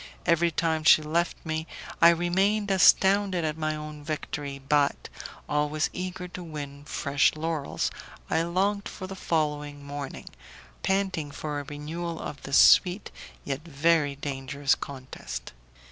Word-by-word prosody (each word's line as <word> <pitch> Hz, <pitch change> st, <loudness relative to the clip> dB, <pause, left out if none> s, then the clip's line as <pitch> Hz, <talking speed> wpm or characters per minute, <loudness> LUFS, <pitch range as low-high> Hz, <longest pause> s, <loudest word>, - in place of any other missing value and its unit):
Every 170 Hz, 0 st, +3 dB
time 160 Hz, -1 st, 0 dB
she 155 Hz, 0 st, +7 dB
left 170 Hz, +3 st, 0 dB
me 160 Hz, 0 st, -3 dB, 0.3 s
I 170 Hz, -, +9 dB
remained 190 Hz, +5 st, +2 dB
astounded 190 Hz, -1 st, +4 dB
at 155 Hz, -1 st, -1 dB
my 155 Hz, -1 st, -1 dB
own 150 Hz, -1 st, -8 dB
victory, 145 Hz, -2 st, -4 dB
but, 140 Hz, +1 st, +1 dB, 0.4 s
always 150 Hz, +1 st, 0 dB
eager 180 Hz, 0 st, -5 dB
to 180 Hz, 0 st, -7 dB
win 145 Hz, -3 st, -7 dB
fresh 145 Hz, -1 st, +1 dB
laurels, 155 Hz, -2 st, -2 dB, 0.4 s
I 160 Hz, -, +1 dB
longed 195 Hz, +4 st, 0 dB
for 185 Hz, -, -7 dB
the 190 Hz, +1 st, -7 dB
following 150 Hz, -4 st, -2 dB
morning, 140 Hz, -1 st, -6 dB, 0.5 s
panting 190 Hz, -6 st, 0 dB
for 145 Hz, 0 st, -4 dB
a -, -, -5 dB
renewal 160 Hz, +4 st, -5 dB
of 140 Hz, -, -6 dB
this 135 Hz, -, +1 dB
sweet 180 Hz, +3 st, +5 dB, 0.3 s
yet 140 Hz, 0 st, -3 dB
very 155 Hz, -2 st, +2 dB
dangerous 140 Hz, 0 st, -1 dB
contest. 95 Hz, -, -7 dB
155 Hz, 135 wpm, -27 LUFS, 145-175 Hz, 0.5 s, I